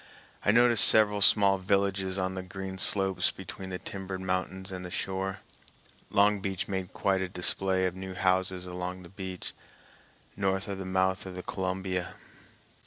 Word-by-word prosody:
I - - +1
noticed 120 +1 +6
several 105 -2 +4
small 100 -1 +7
villages 95 0 0
on 95 0 -1
the 95 - -4
green 95 +1 -7
slopes 95 -1 +2
between 95 -1 -8
the 90 - -4
timbered 95 0 -6
mountains 95 +1 -3
and 90 -1 -6
the 90 - -6
shore. 95 +1 -3 0.7
Long 100 +1 +3
Beach 95 -1 -3
made 95 -2 -4
quite 95 -1 0
a 95 - -3
display 95 +1 +2
of 90 - -1
new 95 0 -7
houses 95 0 +1
along 90 +1 -5
the 85 - -12
beach, 95 -2 -6 0.8
north 95 -1 -1
of 100 -1 -5
the 95 - -5
mouth 95 0 0
of 90 - -8
the 90 - -6
Columbia. 95 -1 -3
95 Hz, 165 wpm, -29 LUFS, -, 0.8 s, small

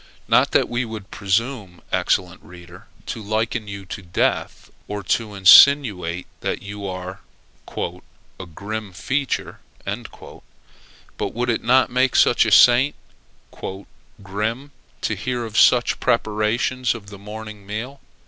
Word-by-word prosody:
Not - - +4
that - - +2
we 120 +1 -1
would 110 -4 -8
presume, 100 -2 -2
excellent 90 -1 0
reader, 90 +3 -14 0.2
to 115 - -5
liken 110 +1 -2
you 100 -1 -7
to 100 - -7
Death, 90 -2 -2 0.2
or 105 -1 -5
to 105 +3 -1
insinuate 95 -4 +6
that - - -3
you 100 0 -7
are 95 +1 -6 0.6
"a 95 - -8
grim 105 +4 -6
feature." 135 +10 -2 0.3
But - - -9
would 120 0 0
it 115 - -2
not 130 +2 +3
make 130 0 +1
a - - +5 0.2
saint 125 +4 +6 1.3
"grim," 110 +8 -3 0.3
to - - -1
hear 120 +3 -3
of 110 -2 -9
such - - +4
preparations 110 +4 0
for 115 - +1
the 100 0 -12
morning 105 -1 -9
meal? 120 +7 -6
105 Hz, 125 wpm, -21 LUFS, 95-120 Hz, 1.3 s, insinuate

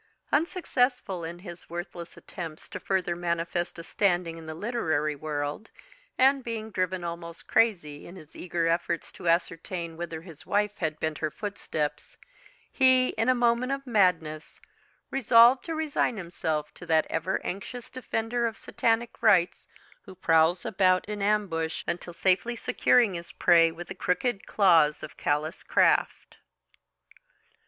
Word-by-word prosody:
Unsuccessful 250 - 0
in 165 +1 -6
his 175 -1 -10
worthless 175 0 -7
attempts 165 -5 -7
to - - -7
further 185 -3 -1
manifest 175 0 -2
a 165 - -7
standing 175 -3 0
in 165 -1 -11
the 155 - -6
literary 160 -8 -1
world, 145 +6 -4 0.5
and 270 +1 +4
being 220 -2 -5
driven 185 -1 -1
almost 170 0 -6
crazy 170 -11 +1
in 175 - -11
his 155 -4 -14
eager 175 -1 -2
efforts 170 0 -1
to 170 - -3
ascertain 170 0 -1
whither 165 -1 -6
his 165 -4 -12
wife 210 0 0
had 155 -2 -2
bent 155 -1 -2
her 155 - -1
footsteps, 155 -7 -4 0.5
he, 260 -1 +4
in - - 0
a 255 - +5
moment 240 +1 +2
of 275 0 -3
madness, 175 - +1 0.5
resolved 245 0 +6
to 330 - -4
resign 305 -7 0
himself 160 -4 -3
to - - -11
that 160 -1 +3
ever 175 +4 -1
anxious 225 +6 -6
defender 235 -1 -2
of 225 -1 -6
Satanic 230 +1 -1
rights 180 -5 +3 0.3
who 190 - -13
prowls 165 0 +3
about 185 -1 +2
in 210 -1 -4
ambush 200 -6 0
until 175 0 -3
safely 185 +7 +1
securing 240 -2 +3
his 170 -1 0
prey 165 -1 +5
with 170 +2 -9
the - - -6
crooked 195 +4 -1
claws 165 -8 +4
of 155 - -8
callous 155 +4 -1
craft. - - +1
180 Hz, 145 wpm, -27 LUFS, 165-225 Hz, 0.5 s, resolved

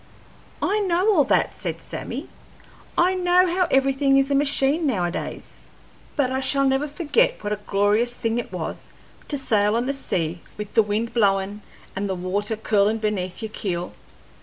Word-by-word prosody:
"I 420 +2 +2
know 380 +2 +2
all 310 -6 +5
that," - - +2
said - - -5
Sammy. - - -6 0.7
"I 360 +2 +4
know 360 0 +4
how 360 0 +1
everything 270 0 +3
is 275 +1 +2
a - - +3
machine 285 +2 +2
nowadays; 180 -9 -3 0.6
but 270 -4 +1
I 260 - 0
shall 275 +1 +1
never 270 +2 +1
forget 345 +12 +1
what 210 - -1
a 210 - -4
glorious 210 +5 +2
thing 230 0 -1
it - - -6
was - - -6 0.4
to 290 - -1
sail 215 -5 +2
on 235 +1 0
the 275 - 0
sea 170 - -2 0.2
with 210 -1 -6
the 225 - +6
wind 215 +2 -2
blowin' 200 -2 +1 0.3
and 200 +1 -2
the 190 - -1
water 200 +4 -1
curlin' 215 0 +2
beneath 210 -2 -3
your 220 - -4
keel. 180 -4 -3
240 Hz, 170 wpm, -23 LUFS, 205-285 Hz, 0.7 s, the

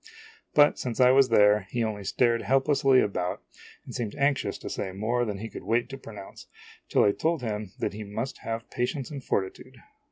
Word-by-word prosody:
But, 145 0 +5
since 125 -1 -4
I 125 0 +7
was 135 0 +5
there, 105 -3 +4
he 120 -1 -1
only 105 -2 -3
stared 115 +3 +1
helplessly 135 0 +3
about 90 -3 -2 0.4
and - - -9
seemed 110 -4 -4
anxious 140 0 0
to - - -9
say 95 - -4
more 115 +6 -1
than 105 -3 -3
he 110 +3 -6
could - - -9
wait 120 +2 0
to 135 - -7
pronounce, 105 -6 -11 0.4
till - - +4
I 100 - +5
told 160 +4 -1
him 105 -3 -4
that - - -2
he 105 +1 -6
must 110 +6 -5
have 115 +1 -5
patience 130 +3 -2
and 140 -3 -6
fortitude. 95 -4 -3
115 Hz, 195 wpm, -27 LUFS, 105-135 Hz, 0.4 s, I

